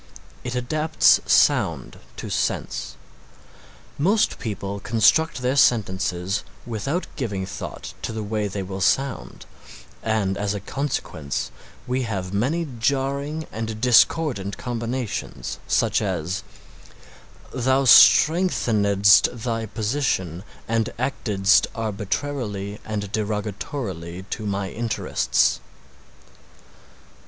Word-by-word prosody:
It 125 0 -4
adapts 155 +6 +3
sound - - +2 0.2
to - - -6
sense. - - -2 1.0
Most 200 +9 +2
people 100 -2 -4
construct 120 +7 +2
their 125 +2 +1
sentences 95 -6 +1 0.2
without 120 - -2
giving 100 -8 -2
thought - - -7
to - - -3
the 110 -1 -4
way 105 0 -1
they 100 0 -4
will 95 +1 -6
sound 135 +9 0 0.6
and 105 -3 0
as 105 0 -1
a - - -3
consequence 95 - -3 0.3
we 130 +1 -1
have 100 -6 -3
many 150 +11 0
jarring 140 +5 -1
and 110 0 -4
discordant 120 -4 +3
combinations 120 - -4
such - - +2
as 85 +5 -2 1.1
"Thou 130 +2 +2
strengthenedst 110 - +5
thy 115 -2 -2
position 105 - -1 0.2
and 115 -1 0
actedst 105 -6 +2
arbitrarily 105 -1 -3
and 105 -2 -4
derogatorily 105 - -4
to 110 -2 -3
my 100 -1 -2
interests." 115 -1 +1
110 Hz, 95 wpm, -23 LUFS, 100-130 Hz, 1.1 s, strengthenedst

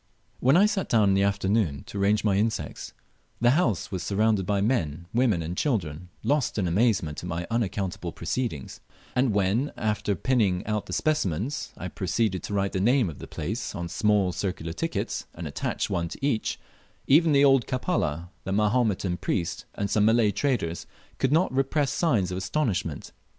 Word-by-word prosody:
When 135 +6 +4
I 200 - +6
sat 210 -2 -1
down 110 -4 +4
in - - +4
the 95 - +3
afternoon 100 -6 +1
to 100 - -6
arrange 105 +2 +2
my 105 -3 +2
insects, 110 +2 -2 0.5
the 120 +1 +4
louse 125 - +1
was 95 -2 -3
surrounded 100 0 +1
by 100 -1 +1
men, 90 - 0
women, 115 -8 +2
and 85 +3 -4
children, 90 - -2
lost 145 -5 +1
in 95 -4 +1
amazement 95 -5 +1
at 90 - -6
my 85 +1 -3
unaccountable 95 -6 -2
proceedings; 85 - -4 0.4
and 125 -1 +3
when, 105 +7 +1
after 105 -2 0
pinning 100 -4 +1
out 105 -1 -2
the - - -8
specimens, 140 - -1
I 90 - -5
proceeded 95 +1 -1
to - - -6
write 100 -1 0
the 95 - 0
name 120 -1 +3
of 75 - -12
the - - -8
place 105 +8 -4
on 85 -3 -4
small 105 0 +2
circular 85 -3 -3
tickets, 80 - -3
and 80 -1 -5
attach 70 - -2
one 85 -3 -1
to 135 - -5
each, 125 -6 0 0.5
even 160 +4 +5
the 140 0 +5
old 135 -3 +4
Kapala, 105 - -1
the 95 - -4
Mahometan 105 -3 +1
priest, 90 -1 -2
and 100 - -1
some 105 0 +2
Malay 110 -1 +4
traders 100 - -1 0.3
could 135 - +1
not 165 0 +3
repress 135 +2 +1
signs 115 - +1
of 90 - -2
astonishment. 95 - -2
105 Hz, 175 wpm, -26 LUFS, 90-125 Hz, 0.5 s, I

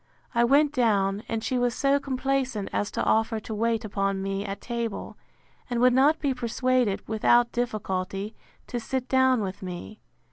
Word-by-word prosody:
I 235 -1 +3
went 285 +4 +4
down, 205 -6 +2
and 225 -1 -2
she 255 +1 0
was 245 -1 +1
so 275 0 +2
complaisant 265 -5 -1
as 205 - 0
to - - -2
offer 225 0 +2
to 220 - -6
wait 225 +1 0
upon 195 -1 -1
me 195 +1 -2
at 200 -1 -5
table; 235 -3 -4 0.5
and 240 -1 -1
would 250 +1 +5
not 280 +5 +4
be 280 -3 0
persuaded, 250 -3 0
without 235 +2 +3
difficulty, 200 -4 -3 0.3
to 245 - -4
sit 255 +2 -3
down 260 -2 +3
with 190 -1 -5
me. 185 +3 -7
235 Hz, 170 wpm, -26 LUFS, 205-255 Hz, 0.5 s, would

